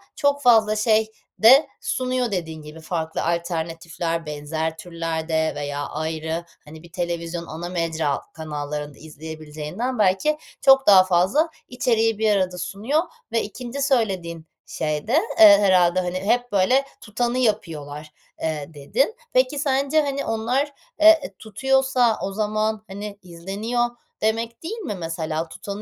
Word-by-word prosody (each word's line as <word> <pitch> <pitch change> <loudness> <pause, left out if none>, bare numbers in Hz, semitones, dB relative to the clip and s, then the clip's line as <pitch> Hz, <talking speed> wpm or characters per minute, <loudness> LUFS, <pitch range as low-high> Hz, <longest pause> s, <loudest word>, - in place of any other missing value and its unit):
çok 285 0 +1
fazla 220 -4 +5
şey 220 0 +2 0.3
de 260 +7 +7
sunuyor, 255 -2 -1
dediğin 160 -4 -4
gibi. 150 +2 -11
Farklı 160 -1 -3
alternatifler 165 0 -2
benzer 155 +2 -3
türlerde 160 -1 -2
veya 145 0 -3
ayrı, 160 +2 -3 0.2
hani, 155 +2 -12
bir 170 - -15
televizyon 170 -1 -3
ana 170 +2 -6
mecra 160 -5 -1
kanallarında 150 -2 -5
izleyebileceğinden 155 - -6
belki 205 +11 +2 0.2
çok 270 -2 +6
daha 190 -2 +9
fazla 190 - +2 0.2
içeriği 225 -3 +1
bir 220 -1 +3
arada 185 -2 0
sunuyor 210 - -1 0.3
ve 230 - +1
2'nci 245 +5 -6
söylediğin 190 - 0 0.2
şey 150 +1 -3
de, 235 - -1 0.3
eee, 205 -2 +10
herhâlde, 185 -2 +4
hani, 180 0 -3
"Hep, 245 +5 0
böyle, 250 +8 +3 0.2
tutanı 240 +3 -2
yapıyorlar." 155 - -2 0.3
eee, 155 -2 -3
dedin. 225 - 0 0.2
Peki 260 +3 +2
sence, 280 +1 +2
hani, 280 -1 -2
onlar, 250 +6 -1 0.3
eee, 315 - +6
e - - -8
tutuyorsa 260 +1 +1
o 195 - -2
zaman, 215 +1 -1
hani, 200 +1 -7
izleniyor 200 +8 -2 0.4
demek, 230 +3 -1
değil 425 +8 -4
mi, 365 - -4
mesela? 165 -1 -3
Tutanın 200 +1 -7
190 Hz, 135 wpm, -23 LUFS, 160-240 Hz, 0.4 s, eee